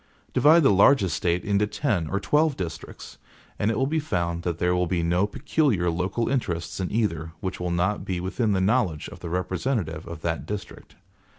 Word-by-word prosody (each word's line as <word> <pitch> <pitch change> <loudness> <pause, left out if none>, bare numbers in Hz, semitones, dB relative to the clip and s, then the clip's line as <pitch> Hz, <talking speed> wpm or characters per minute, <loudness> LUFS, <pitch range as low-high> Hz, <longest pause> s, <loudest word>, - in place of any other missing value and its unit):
Divide 160 +3 +6
the 135 - +5
largest 100 - +4
State 85 0 0
into 100 +1 +2
ten 105 - -1
or 100 - -1
twelve 150 +7 +2
districts, 85 -3 -7 0.4
and 105 - +1
it 115 - 0
will 130 - +2
be 160 +3 0
found 85 - -2
that 85 -2 -2
there 90 +1 +1
will 90 0 +1
be 85 0 0
no 90 +4 +2
peculiar 115 - +1
local 90 +7 -1
interests 90 - -2
in 95 - -2
either, 85 -8 -1
which 95 -3 -4
will 90 0 -2
not 90 +4 0
be 90 -2 -3
within 100 +4 0
the 95 - +1
knowledge 95 -7 +1
of - - -11
the 85 - -6
representative 90 - -2
of 85 -2 -8
the 85 0 0
district. 105 -1 -7
95 Hz, 195 wpm, -25 LUFS, 85-115 Hz, 0.4 s, Divide